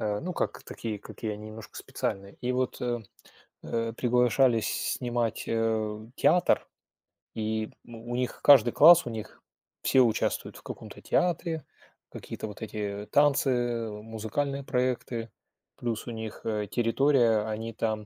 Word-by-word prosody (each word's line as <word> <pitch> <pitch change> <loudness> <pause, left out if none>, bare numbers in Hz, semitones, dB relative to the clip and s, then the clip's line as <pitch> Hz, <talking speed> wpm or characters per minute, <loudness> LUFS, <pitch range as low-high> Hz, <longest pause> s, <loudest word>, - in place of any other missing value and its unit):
Э, 105 -1 -1
ну, 180 +2 -4
как - - -2
такие, 110 -3 -5
какие 110 +2 -6
они 105 +1 -8
немножко 110 0 -10
специальные. 100 0 -4
И 125 - -1
вот, 130 0 -1
э, 120 -2 -1 0.6
э, 115 0 -2
приглашались 125 -1 +2
снимать, 120 -3 -1
э, 110 -1 -1
театр, 180 - +3 0.7
и 110 0 -2 0.2
у 120 +1 -7
них 125 0 -2
каждый 125 -5 +7
класс, 170 +6 +8
у - - -3
них 110 -2 -7 0.4
все 130 - +4
участвуют 115 -3 0
в - - -15
каком-то - - -9
театре, 165 -3 0 0.5
какие-то - - -6
вот 105 +1 -10
эти 105 -2 -4
танцы, 125 -5 +2
музыкальные 110 +6 -3
проекты. 125 -3 -1 0.5
Плюс 115 -1 -3
у - - -3
них, 110 -1 -6
э, 105 -2 -1
территория, 120 -1 +3
они 110 +1 -4
там, 110 -1 -2
115 Hz, 135 wpm, -28 LUFS, 110-125 Hz, 0.7 s, класс